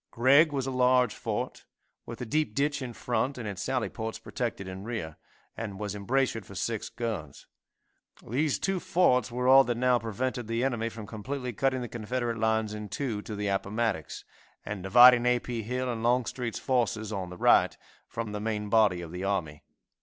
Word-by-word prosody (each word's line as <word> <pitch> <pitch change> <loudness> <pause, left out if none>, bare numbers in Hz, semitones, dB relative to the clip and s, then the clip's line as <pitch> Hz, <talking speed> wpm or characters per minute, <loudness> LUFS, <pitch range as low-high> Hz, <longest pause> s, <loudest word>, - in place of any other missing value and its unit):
Gregg 140 +6 +5
was 135 -2 -1
a 135 - -2
large 125 -2 +3
fort, - - -4 0.4
with 115 - -7
a - - -3
deep 150 -2 -1
ditch 145 0 0
in 125 -2 -4
front, 125 +4 -2
and 115 -4 -5
its 100 -2 -5
sally 130 -3 -1
ports 110 -1 -5
protected 115 -6 -4
in 95 +1 -7
rear, 105 -9 -5 0.4
and 100 -4 -6
was 105 -2 -3
embrasured 115 +2 0
for 100 - -12
six 110 +3 -2
guns. 110 - -5 0.8
These 140 +5 +1
two 195 -1 -1
forts 125 - +2
were 125 +1 -1
all 135 +1 +8
that 120 -1 -1
now 125 0 +3
prevented 120 +2 -3
the 115 +2 -1
enemy 120 -4 0
from 110 -1 -8
completely 125 +4 -5
cutting 130 +3 0
the 120 - -4
Confederate 120 +1 -3
lines 110 -1 +1
in 105 -1 -6
two 115 -3 -3
to 105 - -7
the 105 0 -2
Appomattox, 100 -3 -2 0.4
and 105 -2 -5
dividing 120 +5 +7
A. 125 0 +4
P. 120 -1 -4
Hill 125 +4 -2
and 120 -2 -3
Longstreet's 120 0 0
forces, 110 -4 0
on 95 -3 -4
the 90 - -9
right, - - +4 0.3
from 115 -2 -5
the 105 - -4
main 105 -1 -2
body 105 -5 +4
of 80 - -8
the 90 +2 -5
army. 85 -7 -2
115 Hz, 190 wpm, -28 LUFS, 105-125 Hz, 0.8 s, all